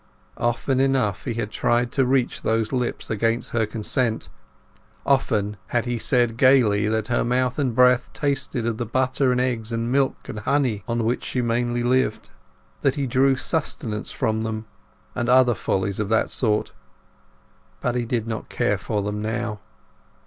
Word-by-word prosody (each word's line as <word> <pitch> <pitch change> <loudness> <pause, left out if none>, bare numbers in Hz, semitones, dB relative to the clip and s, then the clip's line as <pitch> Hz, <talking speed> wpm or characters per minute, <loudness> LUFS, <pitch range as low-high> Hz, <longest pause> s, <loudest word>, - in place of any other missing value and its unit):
Often 120 +2 0
enough 130 -8 +1
had 120 -4 -2
he 115 - -1
tried 120 +3 0
to 135 -2 +1
reach 130 -1 +1
those 110 +1 0
lips 125 -3 -2
against 115 +2 0
her 110 -2 +1
consent—often 110 0 -2
had 120 -1 0
he 120 -1 -2
said 120 -1 +2
gaily 115 -6 +4
that 110 0 -1
her 120 - +1
mouth 125 +2 0
and 130 -5 0
breath 125 0 +4
tasted 135 -4 -2
of 115 -2 -2
the 120 - -1
butter 130 +2 +1
and 125 - +1
eggs 120 -3 -1
and 115 +1 -2
milk 135 0 0
and 110 - -5
honey 125 -3 0
on 115 0 -1
which 120 +3 -1
she 125 - -2
mainly 120 +1 0
lived, 125 -3 0 0.5
that 135 -1 +2
he 140 -2 -1
drew 135 +2 +3
sustenance 130 -7 -1
from 110 0 -1
them, 110 0 -3 0.5
and 120 0 -2
other 125 -1 +5
follies 95 -1 -2
of 105 -2 -1
that 110 - +1
sort. 105 -4 +1 1.1
But 125 - -1
he 120 0 -1
did 115 -1 -1
not 110 -2 -5
care - - 0
for 105 -2 -2
them 105 +1 -3
now. 110 -1 -3
120 Hz, 165 wpm, -23 LUFS, 110-130 Hz, 1.1 s, other